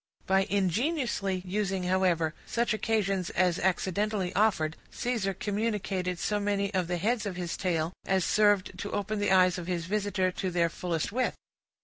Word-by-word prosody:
By 190 0 +3
ingeniously 200 - 0
using, 190 0 -1
however, 180 -4 +2
such 235 -2 +1
occasions 200 -4 0
as 180 -1 +1
accidentally 190 +1 0
offered, 175 -7 +2
Caesar 230 -6 -1
communicated 200 -4 -1
so 210 +4 0
many 200 0 0
of 185 -3 0
the 175 0 -1
heads 215 +4 0
of 190 - -4
his 175 -1 -3
tale, 170 -2 -1
as 190 -2 +2
served 205 -3 +2
to 205 - -4
open 205 +1 -1
the 205 - +1
eyes 185 -1 +5
of 175 - -7
his 175 -2 -2
visitor 200 -1 0
to 185 +1 -3
their 170 -1 +2
fullest 165 0 -2
width. 255 +4 0
190 Hz, 160 wpm, -29 LUFS, 180-210 Hz, -, eyes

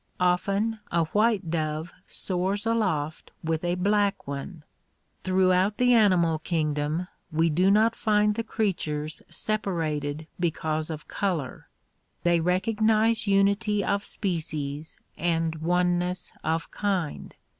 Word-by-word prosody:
Often 195 +5 +1
a 170 -1 +3
white 205 0 +1
dove 155 0 -2
soars 190 +3 -2
aloft 185 -10 -1
with 160 0 -1
a 175 0 +1
black 200 +2 +1
one. 140 +4 -6 0.6
Throughout 185 +2 +3
the 250 0 +4
animal 180 -8 +4
kingdom 155 +1 -1 0.2
we 160 +1 +2
do 180 +5 +3
not 220 +3 +4
find 210 -1 +2
the 230 +2 -2
creatures 155 -9 -2
separ 200 -6 -1
ated 150 0 -3
because 155 -2 -1
of 155 -2 -6
color. 170 -10 -3 0.6
They 175 -1 +3
recognize 215 +5 +2
unity 200 +1 +2
of 200 0 0
species 155 -6 -4 0.2
and 165 -1 0
one 175 +2 +2
ness 180 0 -3
of 165 +1 -1
kind. 190 -7 -2
180 Hz, 120 wpm, -26 LUFS, 160-205 Hz, 0.6 s, the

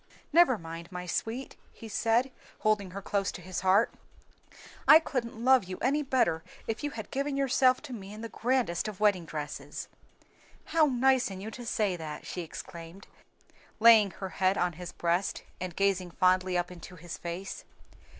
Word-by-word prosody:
"Never 330 -7 +6
mind, 165 0 -8
my 180 0 -5
sweet," 225 +8 -3 0.2
he 225 - -11
said, 230 +4 +1 0.3
holding 210 -3 +1
her 195 +2 -7
close 200 0 0
to - - -7
his 185 +1 -4
heart 190 +4 +3 0.9
"I 310 - +11
couldn't 240 -7 -3
love 260 -5 +6
you 185 0 -6
any 285 +4 +1
better 255 - +1 0.2
if 225 +5 -4
you 290 - 0
had 220 -6 -8
given 275 +1 -1
yourself 260 -1 +3
to 280 -4 -7
me 200 -4 -8
in 215 +1 -9
the 230 - -4
grandest 235 -7 0
of 210 -3 -6
wedding 200 -5 +3
dresses." 150 -2 -6 0.8
"How 320 -2 +3
nice 260 -2 +3
in 190 -1 -7
you 210 +3 -6
to 240 0 -8
say 210 -5 +1
that!" 155 -2 -7
she 180 - -4
exclaimed, 170 +2 -9 0.7
laying 220 -2 +7
her 190 +1 -7
head 185 +3 +1
on 180 -1 +1
his 180 +2 -8
breast 175 +3 -1 0.2
and 180 -2 -5
gazing 195 -2 +1
fondly 185 0 +2
up 175 +1 -1
into 180 +1 -10
his 170 0 -8
face. 175 +3 -6
200 Hz, 175 wpm, -29 LUFS, 180-245 Hz, 0.9 s, I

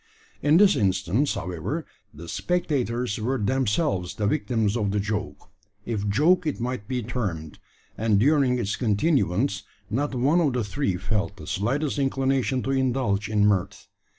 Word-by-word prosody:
In 150 +2 +4
this 200 +1 +6
instance, 95 - +1
however, 85 -2 -4 0.3
the 80 +3 -11
spectators 125 - -1
were 125 +5 -1
themselves 120 - 0
the 105 - -2
victims 105 +1 0
of 105 -4 0
the 105 +1 0
joke 100 -7 -4 0.3
if 105 -3 -2
joke 160 - +3
it 150 - -2
might 120 -3 -3
be 125 -2 -2
termed 95 -10 -4 0.4
and 110 -3 +3
during 135 0 +3
its 105 -4 -1
continuance, 110 - +1 0.3
not 135 +4 -1
one 145 +8 +3
of 145 -6 +1
the 125 -2 0
three 105 -2 -1
felt 100 0 -2
the - - -10
slightest 135 +9 -1
inclination 135 -1 0
to 135 - -1
indulge 125 -7 0
in 105 -1 +3
mirth. 100 -3 0
115 Hz, 150 wpm, -25 LUFS, 100-135 Hz, 0.4 s, this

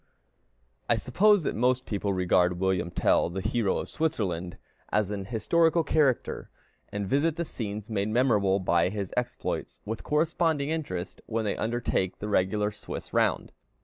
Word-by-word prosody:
I - - +5
suppose 200 +8 +3
that - - -1
most 125 +2 +1
people 100 -1 -2
regard 90 -1 +2
William 95 -2 0
Tell, 85 - +2
the 90 +3 -4
hero 110 0 0
of - - -4
Switzerland, 95 - -2 0.3
as 105 -1 +1
an 100 -2 -4
historical 160 - +2
character, 145 -5 +1 0.4
and 100 0 -3
visit 145 +7 +2
the 170 0 -2
scenes 105 -6 -5
made 105 -2 -1
memorable 105 -5 +3
by 85 -2 +2
his 100 -2 -4
exploits, 125 - -3
with 110 +1 -4
corresponding 155 -1 +1
interest, 100 - -4
when 115 -1 -1
they 105 - 0
undertake 115 -5 -1
the 105 - -5
regular 105 +2 +1
Swiss 105 - -8
round. - - +1
105 Hz, 150 wpm, -28 LUFS, 95-140 Hz, 0.4 s, I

